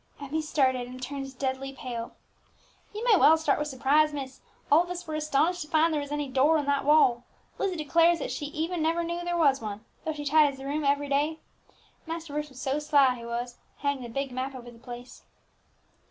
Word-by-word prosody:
Emmie 290 +3 -3
started, 260 -5 +1
and 250 +1 -9
turned 270 0 -6
deadly 270 0 -3
pale. 240 -3 -6 0.8
"You 425 +2 -6
may 465 -4 +6
well 320 -1 +6
start 310 -3 +1
with 300 - -1
surprise, 290 +3 +3
miss; 265 -2 -7 0.3
all 305 +3 +7
of 350 - -5
us 355 0 -5
were 315 - -6
astonished 310 +3 +1
to 300 - -5
find 320 +1 +3
there 300 - 0
was 285 0 -7
any 295 -1 -2
door 270 +5 +3
in 295 - -1
that 280 -1 0
wall. 265 -5 +4 0.4
Lizzie 380 -2 0
declares 330 +2 +3
that 310 - -4
even 315 +4 -3
she - - -1
never 330 +2 +1
knew 340 +1 -3
that 350 - -5
there 350 0 -1
was 280 -6 +3
one, 215 0 -6 0.2
though 315 - -2
she 295 -1 -7
tidies 290 -1 +4
the 270 - -9
room 295 +2 -2
every 285 +1 +1
day. 290 +3 0 0.7
Master 325 -2 -6
Bruce 300 0 -3
was 260 -2 -13
so 270 +2 -1
sly 285 -3 +4
he 240 -2 -9
was 240 +1 -4 0.2
hanging 280 -2 -1
the 240 - -7
big 275 +3 -3
map 260 +2 -4
over 240 -1 -9
the 230 - -16
place!" 245 0 -10
285 Hz, 220 wpm, -28 LUFS, 260-315 Hz, 0.8 s, all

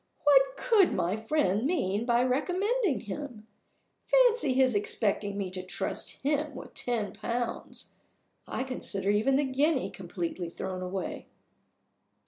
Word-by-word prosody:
"What - - +5
could 445 -7 +4
my 180 +4 0
friend 220 -3 +1
mean 230 - 0
by 240 0 +3
recommending 360 - +1
him? 230 0 -7 0.6
Fancy 485 - +4
his 260 -1 +4
expecting 205 0 0
me 195 -2 -3
to 185 0 -4
trust 185 - -3
him 295 0 0
with - - -9
ten 240 -6 -2
pounds! 235 +2 -4 0.6
I - - -2
consider 205 -6 -2
even 220 +6 +2
the 285 - +3
guinea 275 +2 +1
completely 175 -1 -4
thrown 185 +2 -5
away." 185 +1 -4
245 Hz, 125 wpm, -29 LUFS, 200-295 Hz, 0.6 s, What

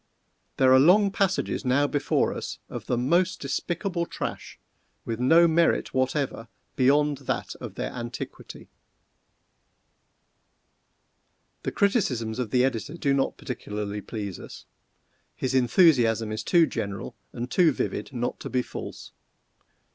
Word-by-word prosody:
There 130 -1 +5
are 130 - +7
long 195 +7 +5
passages 195 -1 0
now 130 +2 +2
before 145 0 0
us - - -6
of - - -7
the 120 - 0
most 170 +9 +1
despicable 170 +5 -2
trash, - - -6 0.5
with 115 0 -3
no 165 +7 +6
merit 165 +1 +2
whatever 130 -2 -1 0.3
beyond 145 +2 +3
that - - -2
of - - -8
their - - -3
antiquity. 120 0 -8 2.9
The - - -3
criticisms 130 - 0
of 125 -4 -2
the 125 +3 +3
editor 135 +5 -3
do 140 -4 +1
not 135 -1 0
particularly 105 0 -5
please 100 -4 -6
us. - - -11 0.7
His 130 0 -2
enthusiasm 120 - +4
is 110 0 -3
too 170 +6 +4
general 100 -9 -5 0.2
and 120 +2 -6
too 175 -4 +4
vivid 140 - -3
not 120 -2 -3
to - - -6
be 125 -1 0
false. - - -8
130 Hz, 130 wpm, -26 LUFS, 120-165 Hz, 2.9 s, are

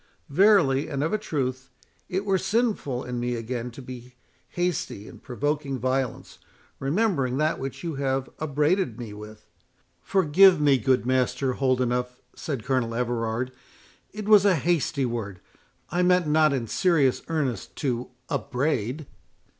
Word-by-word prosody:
Verily, 150 -5 +4
and 140 -1 -2
of 160 - -1
a 215 - +1
truth, 135 -8 -3 0.4
it 190 +2 -2
were 195 -2 +2
sinful 205 - 0
in 125 -1 -4
me 120 0 -1
again 120 +1 -4
to 125 +3 -11
be 125 0 -10 0.3
hasty 175 - -3
in - - -12
provoking 145 +1 -2
violence, 130 0 -2 0.4
remembering 140 - 0
that 155 +2 +1
which 135 +4 -6
you 165 -2 -3
have 135 -1 -1
upbraided 150 - 0
me 115 -4 -7
with"— 105 0 -11 0.6
"Forgive 185 - +5
me, 140 -3 +4
good 130 -2 +2
Master 130 +1 +1
Holdenough," 125 -1 0 0.2
said 135 -8 -4
Colonel 125 -4 0
Everard, 120 0 -1 0.6
"it 210 0 -7
was 210 -2 +7
a 200 -3 +4
hasty 155 -3 0
word; 110 -6 -4 0.5
I 175 +3 +1
meant 180 -1 +3
not 155 0 +4
in 130 -4 -1
serious 145 - +2
earnest 140 - -2
to 125 -4 -2 0.2
upbraid." 135 0 -2
135 Hz, 140 wpm, -25 LUFS, 125-160 Hz, 0.6 s, was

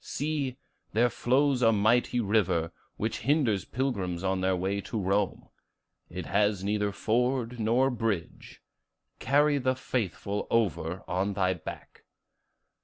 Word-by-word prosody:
See, 145 -3 -2 0.4
there 120 +2 +3
flows 135 +1 +2
a 115 -2 +5
mighty 115 +4 +2
river, 100 -7 +1 0.3
which 110 +2 -2
hinders 120 - +1
pilgrims 100 -9 -2
on 95 -1 0
their 95 0 +2
way 95 +3 -1
to 110 - -4
Rome; 100 0 -1 0.6
it 90 -1 -6
has 100 -1 +1
neither 105 0 0
ford 125 +3 0
nor 120 +5 +2
bridge: 110 -8 -4 0.6
carry 145 +1 +3
the 130 0 +1
faithful 105 -5 -3
over 95 -5 0
on 95 +3 -1
thy 95 -1 +1
back. 85 - -10
110 Hz, 125 wpm, -28 LUFS, 95-125 Hz, 0.6 s, a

